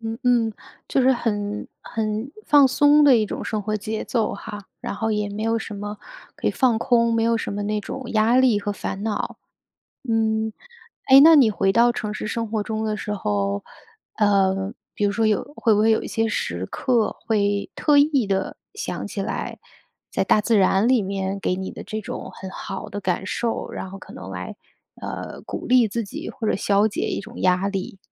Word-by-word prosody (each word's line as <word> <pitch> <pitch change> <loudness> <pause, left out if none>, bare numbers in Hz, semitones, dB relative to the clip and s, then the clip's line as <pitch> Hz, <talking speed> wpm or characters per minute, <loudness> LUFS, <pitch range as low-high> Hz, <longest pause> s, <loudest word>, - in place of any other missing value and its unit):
嗯 225 0 -4
嗯， 235 -3 +3 0.4
就 - - +2
是 265 +1 +5
很 210 -3 -2
很 220 +2 -3 0.2
放 290 -2 +7
松 290 +3 +5
的 275 -4 +7
一 220 - +2
种 - - -5
生 215 -2 -2
活 215 +1 -1
节 215 +1 -4
奏 225 -5 0
哈， 205 +1 -7 0.2
然 - - -4
后 220 +2 -1
也 210 -1 -1
没 205 +1 -5
有 225 0 +1
什 220 -1 -6
么 205 +1 -5 0.4
可 - - -1
以 - - +2
放 250 -4 +2
空， 235 -1 +2
没 225 - +2
有 230 0 +3
什 225 - -3
么 205 +1 -3
那 210 +1 -1
种 265 +6 -6
压 220 +3 +3
力 255 -5 +4
和 205 0 -3
烦 195 0 -5
恼。 215 -2 -3 0.7
嗯， 220 -1 +1 0.6
诶， 270 +1 +9
那 320 +2 +9
你 250 -6 +6
回 195 -2 +1
到 235 +2 +5
城 210 -2 -4
市 215 - -5
生 230 0 -3
活 215 -2 0
中 220 +1 -3
的 215 - -1
时 210 - -4
候， 100 - -1 0.5
呃， 195 0 +2 0.2
比 205 - -1
如 200 - 0
说 220 +1 +1
有 215 -2 +2
会 225 -4 +3
不 205 - +2
会 220 +1 +4
有 220 - +2
一 - - -5
些 225 -1 0
时 90 - -2
刻， 235 - 0
会 205 -2 +1
特 295 -2 +3
意 285 -5 +3
地 195 -1 -1 0.2
想 445 - -4
起 - - -4
来 - - -4 0.5
在 - - +1
大 - - +4
自 220 -1 +3
然 195 +3 +3
里 255 -2 +4
面 195 0 -3
给 180 - 0
你 190 0 -4
的 - - -8
这 215 - -5
种 - - -6
很 190 - -8
好 - - -6
的 205 - -5
感 185 0 -1
受， 230 +3 -2
然 190 - -6
后 195 - -8
可 - - -13
能 95 0 -9
来， 90 -1 -6 0.5
呃， - - -6
鼓 - - -6
励 245 -2 +5
自 230 +2 -2
己 200 - -7
或 220 - -5
者 - - +2
消 200 +2 +2
解 215 - -2
一 - - -2
种 - - -10
压 185 +1 +2
力？ 195 -1 -4
215 Hz, 225 characters per minute, -23 LUFS, 200-230 Hz, 0.7 s, 诶